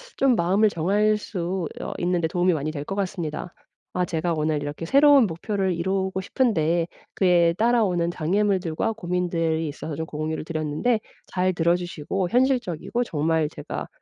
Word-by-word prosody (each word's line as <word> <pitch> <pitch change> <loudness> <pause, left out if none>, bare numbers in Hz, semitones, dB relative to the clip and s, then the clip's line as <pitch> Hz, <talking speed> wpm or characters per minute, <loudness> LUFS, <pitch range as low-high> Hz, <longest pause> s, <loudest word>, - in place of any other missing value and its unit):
좀 270 -3 +3
마음을 195 +5 +3
정할 205 +5 +2
수 180 -4 -3
어 - - -4
있는 175 0 +1
데 160 - +1
도움이 180 +1 +2
많이 155 0 -2
될 145 -1 -5
것 195 - -4
같습니다. 180 -3 -3 0.4
아 180 0 +1
제가 170 0 -1
오늘 155 -1 0
이렇게 145 +3 -5
새로운 280 - +6
목표를 190 +2 -1
이루고 190 +2 -1
싶은데 175 - +1 0.3
그에 175 -3 +4
따라오는 210 -7 +2
장애물들과 185 +2 0
고민들이 170 -5 -1
있어서 145 +1 -6
좀 160 - -3
공유를 155 0 -4
드렸는데 160 +9 0 0.3
잘 185 0 +1
들어 170 0 +2
주시고 175 +1 -3
현실적이고 245 - +1
정말 160 -4 0
제가 - - -6
175 Hz, 355 characters per minute, -24 LUFS, 160-200 Hz, 0.4 s, 새로운